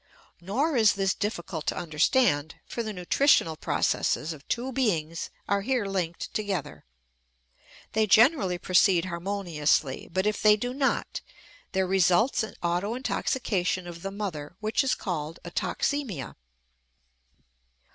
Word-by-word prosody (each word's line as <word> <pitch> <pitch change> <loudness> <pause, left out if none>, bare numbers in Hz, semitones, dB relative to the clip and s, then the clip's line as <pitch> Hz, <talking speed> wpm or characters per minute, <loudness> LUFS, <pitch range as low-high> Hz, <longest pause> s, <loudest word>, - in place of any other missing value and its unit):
Nor 265 - 0
is 220 -4 +5
this 195 -1 +1
difficult 170 -6 -4
to - - 0
understand, 155 - +1
for 235 - -4
the 220 -1 -4
nutritional 180 - +3
processes 155 +1 0
of 145 -2 -14
two 250 +3 -2
beings 170 -11 -1 0.2
are 200 0 +1
here 250 0 0
linked 180 -4 -3
together. 200 -8 -3 1.1
They 220 0 +2
generally 215 - +4
proceed 180 0 +3
harmoniously, 170 -6 -1
but 190 +3 0
if 210 -1 0
they 210 0 +6
do 245 +3 -3
not 270 0 -1 0.5
there 190 -1 +2
results 190 +6 +3
an 220 - -5
autointoxication 190 0 -1
of 170 -1 -9
the 195 - -4
mother 185 -6 -5
which 215 +5 +1
is 265 - +1
called 165 -4 -4
a 175 - -8
toxemia. 235 - -2
195 Hz, 125 wpm, -27 LUFS, 170-220 Hz, 1.1 s, they